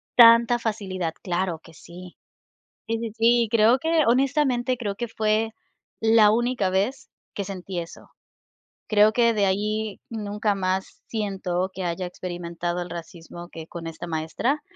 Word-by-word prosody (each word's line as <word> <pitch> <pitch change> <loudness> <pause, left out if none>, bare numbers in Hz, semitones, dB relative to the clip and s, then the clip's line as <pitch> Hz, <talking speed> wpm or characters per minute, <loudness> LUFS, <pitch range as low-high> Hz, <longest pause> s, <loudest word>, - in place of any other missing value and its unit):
tanta 235 0 +7
facilidad. 190 -7 -3
Claro 180 -2 -1
que 165 - -15
sí. 175 +3 -12 0.7
Sí, 230 - -1
sí, 230 - -2
sí, 235 +1 +5
y - - -5
creo 230 +3 +5
que, 320 0 +2
honestamente, 255 -1 +2
creo 205 -4 -3
que 240 +2 -4
fue 220 0 0 0.5
la 220 -1 +6
única 235 -4 +1
vez 205 +8 -1 0.2
que 200 - -3
sentí 185 -2 -5
eso. 170 - -10 0.8
Creo 215 0 +5
que 235 0 +3
de 205 -2 +2
ahí 210 +2 -1
nunca 210 -1 -2
más 190 0 -2
siento 190 -4 -2
que 190 - -5
haya 175 +1 -2
experimentado 175 -1 -4
el 175 - -6
racismo 170 0 -9
que 160 -1 -9
con 170 -1 -8
esta 165 +1 -7
maestra. 165 - -1
205 Hz, 150 wpm, -24 LUFS, 180-230 Hz, 0.8 s, tanta